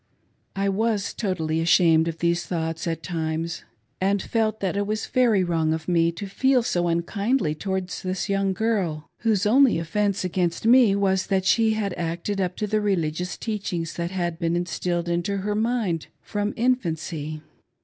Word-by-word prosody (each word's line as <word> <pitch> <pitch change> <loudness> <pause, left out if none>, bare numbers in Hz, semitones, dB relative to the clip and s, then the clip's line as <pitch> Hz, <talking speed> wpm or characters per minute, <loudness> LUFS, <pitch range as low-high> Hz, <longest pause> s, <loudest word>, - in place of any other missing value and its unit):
I 195 0 0
was 205 0 0
totally 165 -6 -1
ashamed 165 -1 +4
of 165 -1 -3
these 170 +1 0
thoughts, 165 -1 -3
at 165 -1 -3
times, 165 -1 -3 0.4
and 200 +2 +2
felt 220 +1 -1
that 195 0 -1
it 200 0 -1
was 215 0 -2
very 235 -7 +3
wrong 165 -3 +1
of 160 0 -5
me 170 -2 +3
to 185 +5 -6
feel 255 +5 +2
so 175 -6 0
unkindly 180 - 0
towards 190 +2 -3
this 185 +1 -2
young 195 -1 +1
girl, 190 -7 -1
whose 220 -3 +1
only 255 +2 +5
offence 200 +4 0
against 180 +1 -1
me 235 -4 +6
was 190 -1 +1
that 190 -1 +1
she 220 +2 +4
had 205 -3 -2
acted 175 +4 -2
up 180 -1 -1
to 210 - -2
the 215 +1 0
religious 180 -3 -1
teachings 190 -7 -3
that 170 0 -3
had 175 -3 -3
been 165 0 0
instilled 175 0 -2
into 175 +4 -1
her 205 +2 -2
mind 215 -7 0
from 205 0 -3
infancy. 160 - -1
185 Hz, 170 wpm, -24 LUFS, 170-210 Hz, 0.4 s, me